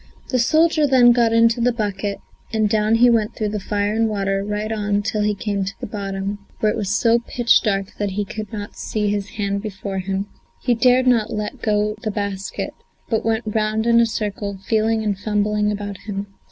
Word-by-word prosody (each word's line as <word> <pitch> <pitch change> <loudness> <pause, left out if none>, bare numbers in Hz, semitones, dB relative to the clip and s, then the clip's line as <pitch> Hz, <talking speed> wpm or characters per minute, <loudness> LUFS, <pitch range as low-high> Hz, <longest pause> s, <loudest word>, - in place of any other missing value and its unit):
The 255 - +1
soldier 310 +4 +3
then 250 -3 +6
got 235 -1 +3
into 230 +1 +4
the 245 +1 +3
bucket, 205 -3 -2 0.3
and 220 -2 +2
down 215 +1 +2
he 240 +2 +6
went 220 -2 +1
through 210 -1 -2
fire 205 +1 -1
and 225 0 +1
water, 195 -1 -1
right 210 +1 -3
on 205 -1 0
till 210 0 -1
he 210 0 +1
came 200 -1 -2
to 195 +1 -5
the - - -5
bottom, 200 -1 -4 0.2
where 215 - +2
it - - -3
was 205 -4 -2
so 230 +4 +3
pitch 240 0 +2
dark 195 -2 -1
that 205 -1 0
he 205 +1 -1
could 215 +1 -6
not 205 -2 -6
see 210 -1 -2
his 205 -1 -2
hand 200 -1 -1
before 195 -2 -5
him. 190 +1 -2 0.4
He 245 - +3
dared 250 +2 +4
not 230 -4 +3
let 210 0 -4
go 210 -1 +1
the 215 - -2
basket, 200 -2 -4 0.4
but 225 - +1
went 225 +1 0
round 215 +1 0
in 235 0 +5
a 235 - +4
circle, 205 -2 -3
feeling 220 0 +1
and 210 -2 0
fumbling 210 0 0
about 205 -1 -4
him. 200 -1 -5
210 Hz, 205 wpm, -21 LUFS, 205-225 Hz, 0.4 s, then